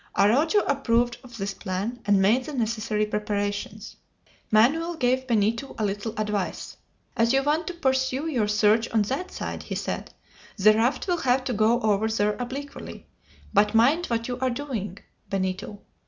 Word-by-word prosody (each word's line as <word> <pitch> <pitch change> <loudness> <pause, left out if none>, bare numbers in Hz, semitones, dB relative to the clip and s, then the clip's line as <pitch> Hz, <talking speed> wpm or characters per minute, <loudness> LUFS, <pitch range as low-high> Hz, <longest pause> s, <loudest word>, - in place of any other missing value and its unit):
Araujo 285 - +4
approved 240 -3 +1
of 240 -2 -12
this 195 -1 -3
plan, 200 +5 -4
and 200 -1 +4
made 225 +7 +3
the 300 - -6
necessary 220 -3 -1
preparations. 205 -1 -3 0.5
Manoel 310 +11 +3
gave 260 -2 0
Benito 230 +3 0
a 215 - 0
little 205 +3 -3
advice. 210 -3 -3 0.4
"As 230 +2 +2
you 270 0 +3
want 310 +3 0
to 360 - -4
pursue 265 -2 0
your 250 -10 0
search 210 +2 +3
on 220 -2 +2
that 270 - -3
side," - - -5
he - - -6
said, - - -4 0.5
"the 215 +2 +6
raft 235 - 0
will 355 -1 +1
have 255 -4 +1
to 255 - -2
go 220 +2 +3
over 215 -1 +2
there 210 -1 +1
obliquely; 275 +3 -7 0.5
but 210 +2 +3
mind 285 +10 +4
what 230 -1 -1
you 250 0 -4
are 260 0 +1
doing, 240 -7 -4 0.3
Benito. 190 +1 -3
230 Hz, 165 wpm, -25 LUFS, 210-265 Hz, 0.5 s, the